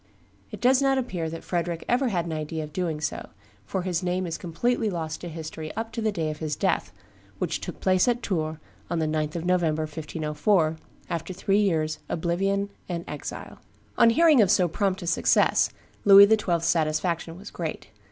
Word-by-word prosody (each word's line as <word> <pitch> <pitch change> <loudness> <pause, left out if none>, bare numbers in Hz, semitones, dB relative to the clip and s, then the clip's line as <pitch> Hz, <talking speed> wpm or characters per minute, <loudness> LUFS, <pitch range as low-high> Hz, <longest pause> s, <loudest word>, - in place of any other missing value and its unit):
It - - -8
does 255 +2 +4
not 270 -1 +3
appear 185 -11 -2
that 165 0 -7
Frederick 170 -1 -2
ever 255 +2 +2
had 175 -7 0
an 165 - -4
idea 155 +1 -3
of 150 0 -9
doing 170 -4 -2
so, 150 - -4 0.4
for 180 - -2
his 180 -2 -1
name 180 0 -1
is 165 -1 -3
completely 215 +7 -1
lost 160 -4 -4
to 175 - -6
history 160 -1 -6
up 225 +1 -4
to 230 0 -4
the 220 -1 +1
day 160 -5 -2
of 150 - -8
his 155 -2 -2
death, - - 0 0.5
which - - -2
took - - -7
place 185 +2 +3
at 245 0 +1
Tours 155 -5 -1 0.3
on 170 - -1
the 160 - +1
9th 155 0 -1
of 170 0 -3
November, 165 -4 +1
1504, 155 +2 0 0.3
after 170 +1 -4
three 195 +2 +1
years' 160 -6 0
oblivion 195 +4 0 0.2
and 170 -1 -3
exile. 150 - -7 0.4
On 230 - +6
hearing 300 +1 +5
of 200 - +4
so 180 0 +4
prompt 190 +2 -1
a - - -5
success, 170 - +3 0.3
Louis 200 0 +9
XII.'s 185 -6 +1
satisfaction 165 +1 0
was 200 +3 -10
great. 165 -3 -5
175 Hz, 190 wpm, -26 LUFS, 160-200 Hz, 0.5 s, Louis